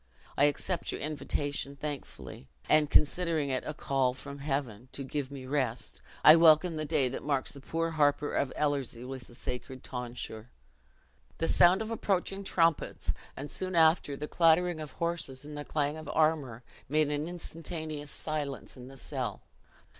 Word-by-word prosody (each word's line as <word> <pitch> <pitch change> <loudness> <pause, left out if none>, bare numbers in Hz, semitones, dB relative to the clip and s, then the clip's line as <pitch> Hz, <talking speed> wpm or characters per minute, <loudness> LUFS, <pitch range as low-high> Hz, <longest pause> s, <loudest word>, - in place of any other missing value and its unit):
I 145 - +5
accept 160 +4 -1
your - - -4
invitation 145 -1 -2
thankfully; 140 - -7 0.2
and, 150 -1 +4
considering 155 -2 +2
it 130 - -1
a 150 - -4
call 130 -3 +1
from 140 +1 -8
Heaven 135 -5 -3
to 140 - -4
give 135 0 -3
me 135 -2 -8
rest, 135 -1 -1 0.2
I 155 +2 +10
welcome 165 +1 +6
the 155 0 -2
day 140 -2 +2
that 130 - -5
marks 140 -3 0
the 140 - -10
poor 165 +4 -1
harper 145 -1 +2
of 140 - 0
Ellerslie 140 -5 -1
with 130 -2 -7
the 120 - -15
sacred 130 0 -6
tonsure." 120 -2 -6 0.9
The 165 - 0
sound 185 +5 +5
of 220 - -6
approaching 195 -2 -1
trumpets, 165 -4 +1 0.2
and, 145 +2 -5
soon 185 -1 -2
after, 160 -3 +4
the 150 - -4
clattering 170 +1 +3
of 155 -2 -7
horses 165 -6 -3
and 150 0 -8
the 145 - -4
clang 145 0 -1
of 155 -2 -8
armor, 150 -7 +1 0.3
made 150 0 +2
an 150 +2 -1
instantaneous 160 -3 -6
silence 145 -2 -4
in 125 -1 -10
the 135 +1 -12
cell. - - -4
145 Hz, 165 wpm, -30 LUFS, 135-160 Hz, 0.9 s, I